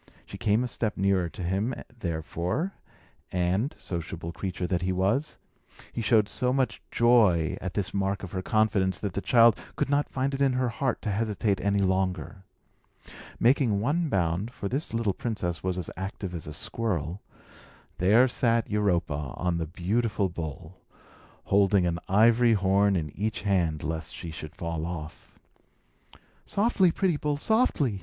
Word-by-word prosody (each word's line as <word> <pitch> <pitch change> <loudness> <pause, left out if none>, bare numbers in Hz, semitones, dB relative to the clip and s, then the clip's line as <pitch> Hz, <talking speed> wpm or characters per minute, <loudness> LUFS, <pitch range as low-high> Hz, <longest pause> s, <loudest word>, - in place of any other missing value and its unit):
She - - -9
came 110 +3 +2
a - - -1
step 110 -3 -3
nearer 95 -2 +2
to 90 - -7
him, 100 +8 -1 0.2
therefore; 85 - -2 0.6
and 90 - 0
sociable 85 -1 -5
creature 90 0 -4
that 90 0 0
he 90 +1 0
was 100 +11 0 0.6
he 115 - -3
showed 110 -2 +3
so 125 +4 0
much 130 -3 0
joy 105 -9 +4
at 95 -2 -5
this 100 -3 -2
mark 100 0 -1
of 95 - -6
her 95 - -3
confidence, 95 -3 +2
that 100 -4 -4
the 100 - -2
child 115 -2 +6 0.2
could - - -1
not 145 +1 +2
find 135 +1 -1
it 135 - -2
in 135 -2 +3
her 130 -1 +1
heart 130 +2 -2
to 105 - -1
hesitate 105 -2 0
any 100 0 +1
longer. 95 0 -1 1.0
Making 120 -4 +3
one 150 +9 0
bound 90 +1 0
(for 100 - -5
this 135 +8 -3
little 115 -4 0
princess 90 -8 -3
was 90 -1 -2
as 90 - -4
active 95 0 -5
as 85 -3 -6
a 75 - -6
squirrel), 90 -3 -2 0.8
there 110 +8 +5
sat 115 -2 +1
Europa 85 -9 0
on 90 -1 0
the 80 - -2
beautiful 100 +4 0
bull, 85 +1 -7 0.6
holding 100 -1 +3
an 85 -1 -1
ivory 115 +4 +5
horn 100 0 +3
in 75 -5 -3
each 105 +1 -2
hand, 85 -7 +1
lest 80 -1 -4
she 85 - -7
should 80 -1 -8
fall 85 -1 -3
off. 80 -3 -8 1.1
"Softly, 200 -3 +2
pretty 180 -3 +1
bull, 145 0 -1
softly!" 150 - +1
100 Hz, 160 wpm, -27 LUFS, 90-115 Hz, 1.1 s, child